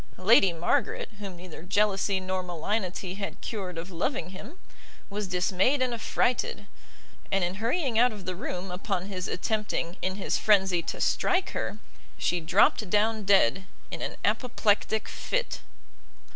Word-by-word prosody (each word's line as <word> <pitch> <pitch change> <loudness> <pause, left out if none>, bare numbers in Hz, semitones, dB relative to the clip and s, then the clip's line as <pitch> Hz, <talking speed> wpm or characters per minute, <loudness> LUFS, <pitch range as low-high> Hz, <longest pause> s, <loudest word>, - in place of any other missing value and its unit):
Lady 195 0 +6
Margaret, 170 +1 0
whom 195 -3 -6
neither 175 -2 -10
jealousy 200 +1 +1
nor 185 0 -2
malignity 180 +1 -3
had 200 0 -5
cured 190 -6 -5
of 170 +3 -6
loving 185 - -2
him, 215 - -10 0.5
was 205 0 -3
dismayed 185 +8 +2
and 255 -1 +1
affrighted; 250 - 0 0.7
and 195 -1 +2
in 175 +1 0
hurrying 240 -1 +1
out 245 +1 +5
of 205 -3 -9
the 185 - -2
room 180 +1 -5
upon 185 0 -2
his 185 -2 -4
attempting, 210 -3 -2
in 185 0 -1
his 200 - -1
frenzy, 190 -4 +4
to - - -5
strike 365 +1 +1
her, - - -3 0.4
she 175 - +1
dropt 170 +4 +3
down 215 +1 +2
dead 190 -3 +4 0.3
in - - -5
an - - -3
apoplectic 220 -3 +1
fit. - - -2
195 Hz, 145 wpm, -28 LUFS, 180-220 Hz, 0.7 s, Lady